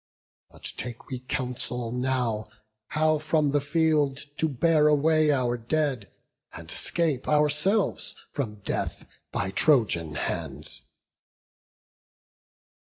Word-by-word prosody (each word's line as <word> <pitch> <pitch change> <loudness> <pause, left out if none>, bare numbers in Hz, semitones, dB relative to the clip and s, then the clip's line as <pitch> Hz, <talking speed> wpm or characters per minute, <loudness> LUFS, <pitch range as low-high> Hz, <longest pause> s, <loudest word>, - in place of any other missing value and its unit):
But - - -19
take 120 -2 -7
we 130 - -3
counsel 125 -2 -3
now 125 -4 -1 0.4
How 155 0 +2
from 155 -1 +2
the 145 0 +2
field 150 -2 +2 0.2
to 160 - +2
bear 150 +2 +3
away 155 +1 +4
our 125 -3 +1
dead, 130 -2 -1 0.4
And 80 0 -9
'scape 160 -7 -1
ourselves 150 +7 +1 0.2
from 105 -7 -4
death - - -3 0.3
by 95 -1 -1
Trojan 95 - +2
hands." - - -4
140 Hz, 105 wpm, -27 LUFS, 120-155 Hz, 0.4 s, away